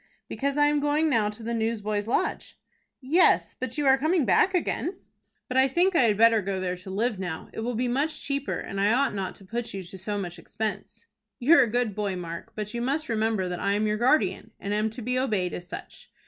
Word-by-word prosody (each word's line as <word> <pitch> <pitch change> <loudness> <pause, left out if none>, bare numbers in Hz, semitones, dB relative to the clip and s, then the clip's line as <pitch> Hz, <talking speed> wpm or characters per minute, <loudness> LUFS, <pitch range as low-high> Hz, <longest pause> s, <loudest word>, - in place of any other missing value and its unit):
"Because 280 +1 -2
I 290 - +5
am 295 0 +2
going 295 +2 +1
now 215 -5 +2
to 215 +2 -10
the 235 +1 -3
Newsboys' 215 -2 -1
Lodge." 235 - -1 0.4
"Yes, 310 +8 +3
but 255 0 -4
you 295 - 0
are 265 0 +5
coming 315 +1 +2
back 375 +8 +3
again." 355 +1 -1 0.5
"But 255 - -2
I 265 +1 +6
think 350 +7 +2
I 260 - +5
had 210 -3 +2
better 225 0 +5
go 195 -1 -2
there 180 -1 -2
to 185 +2 -11
live 210 +2 -1
now. 180 -4 -5
It - - -6
will 240 +2 -2
be 245 +3 0
much 290 +5 0
cheaper, 280 0 -2
and 195 0 -4
I 205 +2 +4
ought 270 0 +2
not 195 -2 -4
to 195 - -13
put 230 +2 -4
you 195 - -5
to 180 +2 -9
so 205 +2 -2
much 175 -3 -5
expense." 215 +5 -5 0.3
"You're 280 +5 +6
a 245 - +3
good 240 -2 0
boy, 200 -2 -2
Mark, 175 +5 -7
but 210 -1 -5
you 235 - -3
must 280 +5 -1
remember 220 -4 0
that 180 -1 -4
I 200 0 +1
am 210 +1 +1
your 210 0 0
guardian, 255 +7 +2
and 200 - -3
am 215 +1 +1
to 230 +2 -8
be 250 +2 0
obeyed 210 -9 0
as 175 - -6
such. - - -9
225 Hz, 235 wpm, -26 LUFS, 200-270 Hz, 0.5 s, I